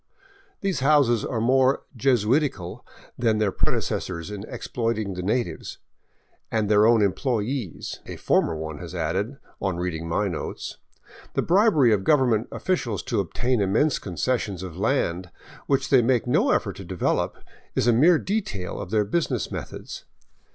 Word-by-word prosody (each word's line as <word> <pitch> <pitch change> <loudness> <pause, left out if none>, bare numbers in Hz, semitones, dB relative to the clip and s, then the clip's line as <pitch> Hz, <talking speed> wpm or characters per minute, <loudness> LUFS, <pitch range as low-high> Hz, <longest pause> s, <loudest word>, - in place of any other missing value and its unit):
These 195 -8 0
houses 135 -5 +4
are 115 - -2
more 130 +3 +3
Jesuitical 120 - +1 0.4
than 115 -3 +2
their 105 -2 +1
predecessors 85 0 -2
in 105 -1 -6
exploit 115 -2 -2
ing 100 -3 -3
the 90 - -4
natives 100 -3 -2 0.2
— - - -42
" - - -40
and 110 -2 +1
their 105 +1 +5
own 115 -2 +5
employees," 115 - -2
a - - -6
former 80 - +1
one 80 -1 -5
has - - -8
added, 105 +8 -2 0.2
on 95 -3 -1
reading 85 -2 -3
my 100 +5 +1
notes. 85 -5 -5 0.6
The - - +1
bribery 170 - +4
of 100 -2 0
government 125 -6 +3
officials 120 - -1
to - - -1
obtain 120 +6 0
immense 110 +10 +2
concessions 100 0 -2
of 90 -4 -7
land 90 -4 0 0.4
which 135 0 +1
they 130 -3 +7
make 120 0 +2
no 125 - +2
effort - - 0
to - - -7
develop - - -1 0.4
is - - +2
a 120 - +5
mere 160 +9 +6
detail 150 - -3
of 100 - -7
their 105 0 +2
business 170 +11 -1
methods. - - -7
110 Hz, 160 wpm, -25 LUFS, 95-130 Hz, 0.6 s, they